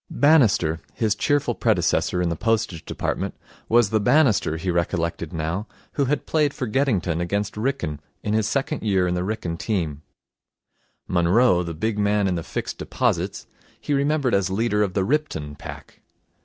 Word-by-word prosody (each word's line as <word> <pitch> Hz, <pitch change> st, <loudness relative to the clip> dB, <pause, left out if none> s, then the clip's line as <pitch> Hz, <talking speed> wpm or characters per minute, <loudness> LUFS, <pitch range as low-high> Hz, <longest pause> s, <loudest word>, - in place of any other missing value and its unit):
Bannister, 110 Hz, -, +3 dB
his 110 Hz, -3 st, +1 dB
cheerful 145 Hz, -1 st, +1 dB
predecessor 90 Hz, -4 st, +1 dB
in 85 Hz, -, +1 dB
the 85 Hz, -, -1 dB
Postage 110 Hz, -4 st, -1 dB
Department, -, -, -3 dB, 0.3 s
was 115 Hz, -2 st, +4 dB
the 110 Hz, -, +3 dB
Bannister, 115 Hz, -, +3 dB
he 90 Hz, +2 st, -2 dB
recollected 85 Hz, -1 st, -1 dB
now, 80 Hz, +6 st, -3 dB, 0.2 s
who 140 Hz, -, 0 dB
had 140 Hz, +2 st, -1 dB
played 150 Hz, -3 st, +1 dB
for 130 Hz, -, -2 dB
Geddington 105 Hz, -, 0 dB
against 100 Hz, +4 st, -1 dB
Wrykyn 110 Hz, -, -2 dB, 0.2 s
in 105 Hz, -, -1 dB
his 110 Hz, -1 st, +2 dB
second 140 Hz, +1 st, -1 dB
year 95 Hz, -4 st, +2 dB
in 90 Hz, -, 0 dB
the 90 Hz, -, -1 dB
Wrykyn 90 Hz, -5 st, -3 dB
team. 80 Hz, -9 st, -2 dB, 1.1 s
Munroe, 90 Hz, +3 st, +3 dB
the 85 Hz, -2 st, -5 dB
big 105 Hz, +5 st, -1 dB
man 105 Hz, -1 st, +2 dB
in 95 Hz, -, +1 dB
the 85 Hz, -, -2 dB
Fixed -, -, -5 dB
Deposits, -, -, -1 dB, 0.3 s
he 145 Hz, -, -2 dB
remembered 140 Hz, -2 st, +1 dB
as 100 Hz, -1 st, +2 dB
leader 105 Hz, +2 st, +1 dB
of 100 Hz, -3 st, 0 dB
the 95 Hz, -, +2 dB
Ripton 100 Hz, -, -1 dB
pack. -, -, -10 dB
105 Hz, 165 wpm, -23 LUFS, 85-120 Hz, 1.1 s, was